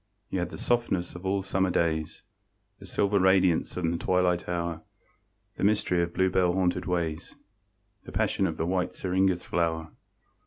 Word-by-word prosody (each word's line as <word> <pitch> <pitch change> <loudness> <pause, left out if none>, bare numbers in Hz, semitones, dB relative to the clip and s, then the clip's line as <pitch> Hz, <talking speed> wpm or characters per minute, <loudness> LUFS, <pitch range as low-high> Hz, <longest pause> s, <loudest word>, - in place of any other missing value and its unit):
You 95 - -1
had 90 -1 -2
the - - -8
softness 115 -7 0
of 90 +2 -6
all 95 0 0
Summer 95 -1 0
days, 80 -1 -1 0.6
The 95 - -12
silver 100 +2 +1
radiance 95 -3 +3
of 90 - -2
the 85 +1 +1
twilight 90 -1 +1
hour, 85 -2 -2 0.8
The - - -4
mystery 100 -4 +2
of 85 0 -1
bluebell 95 -1 +2
haunted 90 -1 0
ways, 85 -2 -2 0.7
The - - -9
passion 95 - +1
of 80 -2 -4
the 80 - -1
white 90 0 -1
syringa's 95 -1 0
flower. 80 -1 -1
90 Hz, 160 wpm, -28 LUFS, 85-95 Hz, 0.8 s, radiance